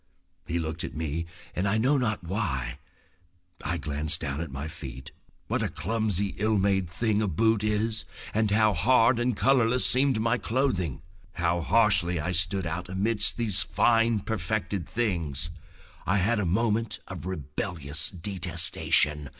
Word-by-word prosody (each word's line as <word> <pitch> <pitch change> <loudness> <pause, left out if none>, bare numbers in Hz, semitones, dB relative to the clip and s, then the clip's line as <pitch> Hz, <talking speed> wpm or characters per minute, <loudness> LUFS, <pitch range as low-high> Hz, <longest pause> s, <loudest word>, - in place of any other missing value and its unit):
He 85 - -1
looked 80 +1 -3
at - - -6
me, 80 +1 -3 0.3
and, 95 +3 0
I 100 +3 +2
know 130 +6 +3
not 115 -8 0
why, 70 - -2 0.8
I 85 +3 -1
glanced 75 -1 -1
down 70 +3 -3
at 85 - -5
my 70 +3 -5
feet. 65 -4 -8 0.3
What - - -1
a - - 0
clumsy, 100 0 -1
ill 110 +1 +2
made 95 -2 +1
thing 110 +4 0
a 105 - +1
boot 110 +4 +2
is, 110 +1 0 0.3
and 110 0 +2
how 110 +1 +3
hard 115 +5 +4
and 120 -2 0
colorless 125 -2 +3
seemed 130 -2 +3
my 115 +2 +1
clothing! 110 - -1 0.3
How 85 0 0
harshly 90 -4 +3
I 85 +4 -2
stood 90 +2 +1
out 85 +2 -4
amidst 105 +4 +1
these 110 -5 +1
fine, 115 -2 +2
perfected 100 -4 -3
things. 85 - -2 0.6
I 100 - +3
had 105 +4 +2
a 100 - 0
moment 110 +4 0
of 90 -2 -7
rebellious 80 -2 -2
detestation. 85 -5 +1
95 Hz, 150 wpm, -27 LUFS, 85-110 Hz, 0.8 s, hard